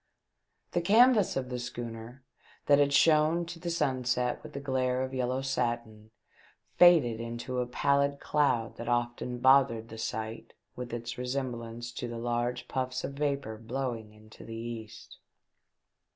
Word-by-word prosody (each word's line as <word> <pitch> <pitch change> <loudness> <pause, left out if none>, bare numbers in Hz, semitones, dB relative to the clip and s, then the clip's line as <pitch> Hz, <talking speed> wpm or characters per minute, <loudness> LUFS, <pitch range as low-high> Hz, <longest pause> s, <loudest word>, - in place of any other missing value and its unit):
The 175 - +1
canvas 220 +3 +5
of 130 -1 -3
the 125 -1 -3
schooner, 120 +1 -7 0.4
that 145 -1 +5
had 140 -1 +3
shone 155 +3 +4
to 170 0 -8
the 175 0 -4
sunset 130 -6 0
with 155 -1 -11
the 140 - -4
glare 130 -2 0
of 130 0 -5
yellow 130 +1 -1
satin, 120 -4 -2 0.7
faded 155 -11 +6
into 120 +2 -4
a 125 - -1
pallid 140 +2 +1
cloud 125 -6 +1
that 115 - -5
often 120 +1 -1
bothered 125 -3 +4
the 110 - -9
sight 110 +1 -5 0.2
with 125 -1 -6
its 120 +1 -5
resemblance 120 -2 -4
to 120 - -5
the 120 0 -6
large 120 +1 -2
puffs 130 -1 -2
of - - -4
vapour 140 -6 -2
blowing 115 -2 -4
into 110 +1 -15
the 115 - -8
east. 115 -1 -8
125 Hz, 150 wpm, -30 LUFS, 115-140 Hz, 0.7 s, faded